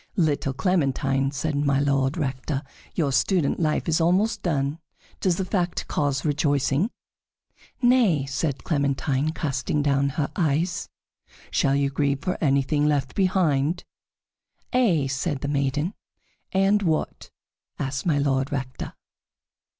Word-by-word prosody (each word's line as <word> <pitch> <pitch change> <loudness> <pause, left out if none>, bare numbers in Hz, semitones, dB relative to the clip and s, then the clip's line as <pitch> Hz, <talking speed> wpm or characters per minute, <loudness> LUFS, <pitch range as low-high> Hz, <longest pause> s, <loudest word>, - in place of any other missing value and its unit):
"Little 145 -5 +1
Clementine," 135 -4 +1
said 145 +2 -2
My 140 -1 +2
Lord 140 -1 +1
Rector, 135 -1 -2 0.3
"your 150 -5 +1
student 170 +2 +1
life 155 -2 0
is 165 0 +2
almost 185 +7 +2
done. 145 -2 -1 0.4
Does 185 -3 +2
that 190 - -2
fact 180 -3 -1
cause 140 -2 -1
rejoicing?" 145 - +1 0.9
"Nay," 230 - +4
said 140 +1 -2
Clementine, 140 -1 0
casting 145 -1 -1
down 140 -1 +2
her 145 -3 0
eyes. 170 +1 0 0.6
"Shall 135 0 +2
you 140 -1 +1
grieve 140 -1 0
for 180 - 0
anything 145 +1 +2
left 140 -3 0
behind?" 175 -5 +1 0.9
"Ay," 200 - +3
said 135 +2 -2
the 140 - -2
maiden. 145 +5 0 0.6
"And 195 +2 +3
what?" 160 -5 -1 0.5
asked 135 -1 -3
My 155 -4 +3
Lord 135 -1 +1
Rector. 130 -2 -4
145 Hz, 125 wpm, -25 LUFS, 135-170 Hz, 0.9 s, Nay